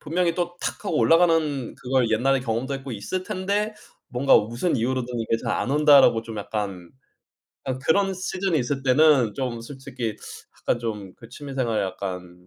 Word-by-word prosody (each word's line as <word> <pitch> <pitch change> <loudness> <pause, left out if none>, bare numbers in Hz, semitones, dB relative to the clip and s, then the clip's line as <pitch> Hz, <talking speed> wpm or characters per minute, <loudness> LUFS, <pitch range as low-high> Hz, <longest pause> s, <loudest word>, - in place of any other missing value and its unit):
분명히 170 +2 0
또 175 0 -3
탁 - - -4
하고 180 -6 -1
올라가는 155 -1 +3
그걸 125 -2 0
옛날에 130 +5 +2
경험도 125 +3 -2
했고 135 0 -7
있을 115 - -4
텐데 200 +4 -2 0.3
뭔가 125 +3 +4
무슨 120 +11 -1
이유로든 125 0 -2
이게 115 0 0
잘 - - 0
안 - - -1
온다.'라고 145 -5 +6
좀 115 -1 -8
약간 100 -4 -5 0.7
아 130 -1 -3
그런 195 +8 +2
시즌이 185 -2 -1
있을 135 +2 -2
때는 135 -4 +4
좀 120 -2 -3
솔직히 120 -4 -6 0.4
약간 120 - 0
좀 105 -5 -5
그 115 - -14
취미생활에 130 -5 -2
약간 90 -2 -7
130 Hz, 330 characters per minute, -24 LUFS, 115-155 Hz, 0.7 s, 온다.'라고